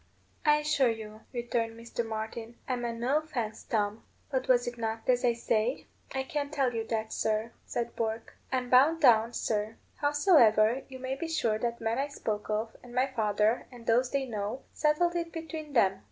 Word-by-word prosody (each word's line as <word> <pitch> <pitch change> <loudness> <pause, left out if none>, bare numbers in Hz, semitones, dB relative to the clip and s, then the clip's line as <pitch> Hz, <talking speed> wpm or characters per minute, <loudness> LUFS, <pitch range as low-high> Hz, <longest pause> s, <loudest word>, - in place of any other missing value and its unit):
"I 300 -1 +6
assure 300 -4 +2
you," 220 -1 -6
returned 235 -2 -2
Mr. 235 0 -3
Martin, 225 +1 -5
"I 255 - 0
meant 235 -1 -3
no 260 +6 +2
offence, 250 -9 -4
Tom; 210 0 -1 0.3
but 260 -1 -1
was 245 -1 +4
it 240 - -4
not 225 0 -3
as 250 -1 +3
I 240 -1 +4
say?" 230 +1 0 0.3
"I 265 - 0
can't 290 0 -3
tell 270 -4 +1
you 225 -1 -1
that, 220 -1 -2
sir," 220 +1 0 0.2
said 235 -1 -3
Bourke; 225 0 -3 0.2
"I'm 255 -1 -1
bound 285 +6 +6
down, 235 -5 +5
sir. 215 0 -1 0.2
Howsoever, 270 - +4
you 260 - -8
may 260 +1 -3
be 300 +5 -4
sure 235 -10 0
the 235 0 -1
man 225 +2 -1
I 280 - 0
spoke 215 -7 -4
of 215 +1 -1
and 245 0 -12
my 255 +1 +4
father, 220 -3 +1
and 240 -2 -12
those 245 +3 +3
they 275 0 0
know, 215 +1 -4
settled 320 +3 +2
it 335 -1 -2
between 320 -2 -6
them." 195 -6 +3
240 Hz, 190 wpm, -30 LUFS, 225-270 Hz, 0.3 s, I